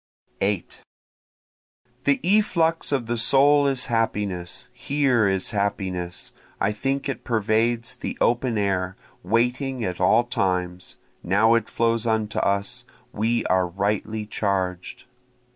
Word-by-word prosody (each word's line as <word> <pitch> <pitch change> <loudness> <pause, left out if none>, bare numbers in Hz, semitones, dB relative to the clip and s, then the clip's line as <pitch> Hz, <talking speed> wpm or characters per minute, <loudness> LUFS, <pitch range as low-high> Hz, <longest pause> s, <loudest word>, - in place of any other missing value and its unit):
8 100 -3 -2 1.3
The 140 -1 +3
efflux 170 -5 +2
of 135 -4 0
the 120 0 -2
soul 140 +4 +5
is 135 -2 0
happiness, 100 -6 -2
here 135 -7 +1
is 95 -1 0
happiness, 95 -4 -3 0.3
I 100 - +1
think 135 +6 -2
it 140 - -4
pervades 115 +1 0
the - - -5
open 120 -1 +1
air, 95 -2 -1 0.3
waiting 125 +5 0
at 90 0 -4
all 110 +6 +4
times, 90 -5 -2 0.3
Now 105 +5 +3
it 115 -2 +1
flows 115 0 0
unto 110 -1 0
us, 100 +5 -1 0.3
we 115 +2 0
are 95 -1 +2
rightly 105 +4 -2
charged. 95 -4 -3
110 Hz, 120 wpm, -24 LUFS, 95-120 Hz, 1.3 s, soul